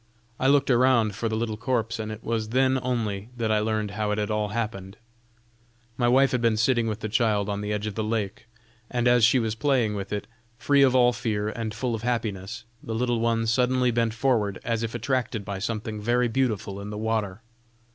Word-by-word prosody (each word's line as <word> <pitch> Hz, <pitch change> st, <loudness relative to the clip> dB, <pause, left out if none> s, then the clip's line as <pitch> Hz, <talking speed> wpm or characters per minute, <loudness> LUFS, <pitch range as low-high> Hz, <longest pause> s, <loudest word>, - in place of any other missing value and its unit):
I 130 Hz, -, +2 dB
looked 140 Hz, 0 st, +4 dB
around 120 Hz, -3 st, +4 dB
for 115 Hz, +4 st, -2 dB
the 110 Hz, -, -1 dB
little 110 Hz, -1 st, -2 dB
corpse, 115 Hz, -2 st, -1 dB
and 110 Hz, 0 st, -4 dB
it 110 Hz, +1 st, -8 dB
was 110 Hz, -2 st, -2 dB
then 130 Hz, +2 st, +2 dB
only 110 Hz, -5 st, -2 dB
that 115 Hz, -2 st, 0 dB
I 110 Hz, -, +3 dB
learned 110 Hz, -1 st, -1 dB
how 105 Hz, 0 st, -2 dB
it 105 Hz, -, 0 dB
had 105 Hz, 0 st, -1 dB
all 105 Hz, 0 st, 0 dB
happened." 105 Hz, -3 st, -4 dB, 1.0 s
"My 120 Hz, 0 st, +1 dB
wife 135 Hz, +2 st, +4 dB
had 125 Hz, -, 0 dB
been 115 Hz, -2 st, +2 dB
sitting 120 Hz, 0 st, +2 dB
with 110 Hz, 0 st, -3 dB
the 110 Hz, -, -2 dB
child 105 Hz, -2 st, +1 dB
on 100 Hz, 0 st, -2 dB
the 105 Hz, 0 st, -3 dB
edge 105 Hz, 0 st, -2 dB
of 105 Hz, -, -3 dB
the 110 Hz, -, -2 dB
lake, 105 Hz, -1 st, -3 dB, 0.4 s
and 125 Hz, -1 st, 0 dB
as 120 Hz, -1 st, +4 dB
she 115 Hz, +4 st, +6 dB
was 110 Hz, -3 st, 0 dB
playing 120 Hz, -2 st, +1 dB
with 100 Hz, -1 st, -5 dB
it, 105 Hz, -1 st, -3 dB, 0.3 s
free 140 Hz, +3 st, +3 dB
of 130 Hz, -2 st, +5 dB
all 125 Hz, -1 st, +5 dB
fear 105 Hz, -2 st, -2 dB
and 110 Hz, 0 st, -4 dB
full 115 Hz, +3 st, -2 dB
of 110 Hz, -, -3 dB
happiness, 115 Hz, -2 st, -3 dB, 0.2 s
the 110 Hz, -, -5 dB
little 120 Hz, 0 st, 0 dB
one 115 Hz, 0 st, +1 dB
suddenly 125 Hz, +2 st, +2 dB
bent 115 Hz, -1 st, 0 dB
forward, 115 Hz, -6 st, +1 dB
as 115 Hz, -1 st, -1 dB
if 115 Hz, 0 st, -3 dB
attracted 120 Hz, -3 st, -1 dB
by 100 Hz, -2 st, -4 dB
something 110 Hz, 0 st, -4 dB
very 120 Hz, +3 st, +2 dB
beautiful 110 Hz, -5 st, -1 dB
in 100 Hz, -, -7 dB
the 105 Hz, -, -5 dB
water. 110 Hz, -2 st, -2 dB
115 Hz, 215 wpm, -26 LUFS, 105-120 Hz, 1.0 s, she